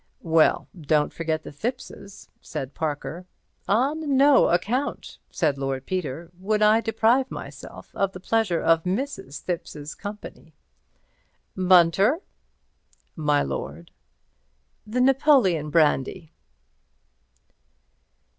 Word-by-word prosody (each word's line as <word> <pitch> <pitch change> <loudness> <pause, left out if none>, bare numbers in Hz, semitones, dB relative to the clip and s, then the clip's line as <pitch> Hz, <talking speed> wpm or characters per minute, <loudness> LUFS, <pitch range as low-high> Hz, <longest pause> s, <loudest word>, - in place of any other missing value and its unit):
"Well, 160 -1 +3
don't 150 -3 0
forget 160 -1 -2
the - - -9
Thippses," 200 - -7
said 145 -5 -6
Mr. - - -35
Parker. 160 +3 -4 0.4
"On 275 +6 +1
no 280 0 +6
account," 230 +11 -2
said 150 -5 -1
Lord 135 -1 -3
Peter, 170 -2 -4
"would 210 +3 0
I 215 +2 +5
deprive 230 +4 +2
myself - - -10
of 195 -1 0
the 185 - -9
pleasure 200 -3 0
of 165 0 +3
Mrs. 195 - -4
Thipps's 155 -4 -5
company. 205 +1 -10 1.0
Bunter!" 185 - +4 1.0
"My 150 -3 +1
lord?" 70 +4 -6 1.0
"The 245 +4 -1
Napoleon 255 - +3
brandy." 155 +1 +1
180 Hz, 100 wpm, -24 LUFS, 155-225 Hz, 1.0 s, no